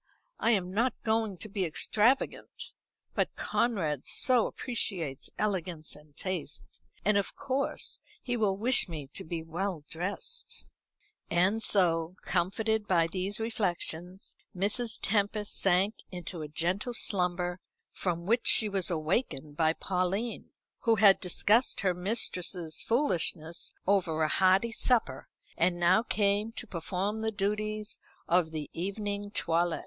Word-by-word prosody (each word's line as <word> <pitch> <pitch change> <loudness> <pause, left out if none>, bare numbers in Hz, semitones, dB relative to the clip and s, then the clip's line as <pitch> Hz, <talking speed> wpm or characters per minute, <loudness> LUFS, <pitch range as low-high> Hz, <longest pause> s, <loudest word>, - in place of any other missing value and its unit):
I - - +2
am 185 -5 +1
not 235 +4 +1
going 220 -3 0
to 215 - -5
be 200 -2 -2
extravagant, 215 - +1 0.4
but - - -1
Conrad 165 - 0
so 250 -3 +3
appreciates 180 - -3
elegance 180 -6 -2
and 150 -1 -18
taste; 185 -6 -5 0.2
and 210 0 +4
of 200 - -4
course 270 +1 -1 0.2
he 245 - -3
will 205 -4 +1
wish 235 -1 +3
me 150 -5 -7
to - - -6
be 165 0 -4
well 170 0 -3
dressed." 200 - -5 0.6
And 185 +6 +2
so, 170 -5 +2
comforted 205 +4 0
by 170 -4 +4
these 195 +3 -1
reflections, 185 -4 -2 0.2
Mrs. 215 +4 +1
Tempest 205 0 0
sank 195 +2 +3 0.2
into 175 -2 -6
a 155 - -4
gentle 180 - -1
slumber, 180 -3 +1 0.3
from 170 -2 -2
which 230 +5 +2
she 220 - +6
was 195 -3 +1
awakened 155 - -1
by 160 0 +3
Pauline, 190 +6 -2 0.3
who 230 -1 +3
had 200 -2 +6
discussed 210 +6 +2
her 185 -2 +2
mistress's 180 -3 -1
foolishness 175 - +1
over 170 -5 +2
a - - +3
hearty 190 +7 +3
supper, 225 - +1 0.3
and 175 +1 +2
now 175 +4 +5
came 205 -1 +1
to 240 - -6
perform 195 +3 -3
the 220 0 0
duties 210 +1 -2 0.3
of 175 -2 +3
the 155 -2 -5
evening 200 +3 -3
toilet. 170 -3 0
190 Hz, 135 wpm, -30 LUFS, 170-215 Hz, 0.6 s, she